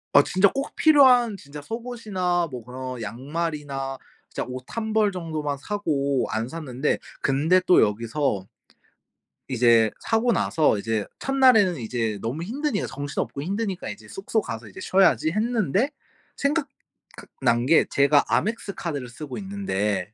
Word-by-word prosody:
아 - - +10
진짜 190 +2 +3
꼭 275 +1 -4
필요한 255 -7 +5
진짜 145 -2 -10
속옷이나 205 -4 -2
뭐 125 -2 -7
그런 125 0 -6
양말이나 135 +3 -4 0.3
진짜 - - -4
옷 125 0 -6
1 220 -1 -4
벌 215 -2 +3
정도만 155 -5 -3
사고 140 -7 -1
안 110 +1 -2
샀는데. 150 -2 -2 0.2
근데 150 +7 +3
또 180 - +6
여기서 110 -1 0 1.0
이제 115 -3 +4
사고 225 +2 +1
나서 155 - +2
이제 110 0 -1
첫날에는 255 -10 +4
이제 115 -3 -2
너무 130 +9 -3
힘드니까 255 - -2
정신없고 140 0 -4
힘드니까 195 +1 -3
이제 - - -9
숙소 310 - -2
가서 115 - -7
이제 - - -12
쉬어야지 185 -4 +3
했는데 220 - +1 0.5
생각 285 +1 0 0.5
각 - - -12
난 120 +1 +2
게 160 +2 +5
제가 140 +1 +3
Amex 215 -2 0
카드를 145 -8 -4
쓰고 135 +2 -7
있는데 105 - -2
155 Hz, 300 characters per minute, -24 LUFS, 125-210 Hz, 1.0 s, 아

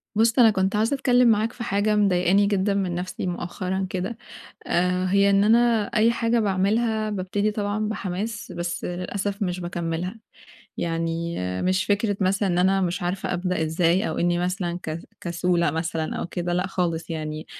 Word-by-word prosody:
بُصّ 225 +3 +3
أنا 230 -2 +8
كنت 190 0 0
عايزة 225 +6 +2
أتكلّم 250 -2 +3
معاك 225 +1 +2
في 240 - -6
حاجة 210 0 +1
مضايقاني 195 -1 +3
جدًا 200 0 +1
من 190 -3 -1
نَفْسي 180 +1 -4
مؤخرًا 185 +2 -3
كده. 190 +5 -3 0.5
آآ، 180 +1 +1
هي 200 +1 +4
إن 200 0 +4
أنا 230 0 +4
أي 225 +2 +4
حاجة 235 0 +1
باعملها 215 +2 +1
بابتدي 205 +1 -1
طبعًا 210 0 -2
بحماس 210 +1 -4
بس 175 0 -4
للأسف 195 +3 -3
مش 180 -1 -2
باكمّلها، 175 +3 -4 0.6
يعني 165 0 -2 0.3
مش 185 +1 +1
فكرة 205 0 +1
مثلًا 195 +1 +1
إن 175 -1 +1
أنا 190 +2 +3
مش 180 0 -1
عارفة 180 +2 -2
أبدأ 180 -1 -1
إزاي 170 +5 +1
أو 160 - -3
إني 175 0 +1
مثلًا 180 -1 -2
ك 155 +1 -4 0.2
كسولة 170 0 +1
مثلًا 160 -1 -2
أو - - -3
كده، 175 0 -3
لأ 180 +2 0
خالص 175 -3 -2
يعني، 155 -1 -4
190 Hz, 165 wpm, -24 LUFS, 175-210 Hz, 0.6 s, أنا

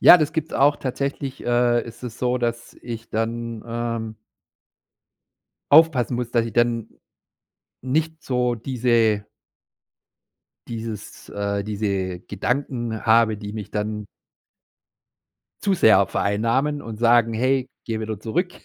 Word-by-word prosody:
Ja, 180 - +10
das 155 -1 0
gibt's 160 -1 -2
auch. 145 +2 +4
Tatsächlich, 140 +1 -4
äh, 120 0 +3
ist 115 +1 -11
es 120 -1 -7
so, 125 0 +1
dass 120 -1 -3
ich 115 -1 -7
dann, 115 0 -3
ähm 115 -1 -3 1.6
aufpassen 145 -6 +5
muss, 120 -1 -3
dass 115 -2 +2
ich 115 - -6
dann 120 -1 +1 0.9
nicht 155 +4 -1
so 125 -2 0
diese 115 -3 +1 1.4
dieses 110 -2 -7
äh, 100 0 -2
diese 100 -4 -2
Gedanken 120 +2 -2
habe, 110 -1 +4
die 105 0 -7
mich 105 -3 -6
dann 105 0 -3 1.6
zu 200 -1 +3
sehr 110 - +5
vereinnahmen 115 +10 0
und 110 -1 -8
sagen: 115 -1 +4
„Hey, 130 +3 +1 0.2
geh 110 -1 -3
wieder 110 -2 -4
zurück.“ 175 - -1
115 Hz, 120 wpm, -23 LUFS, 110-125 Hz, 1.6 s, Ja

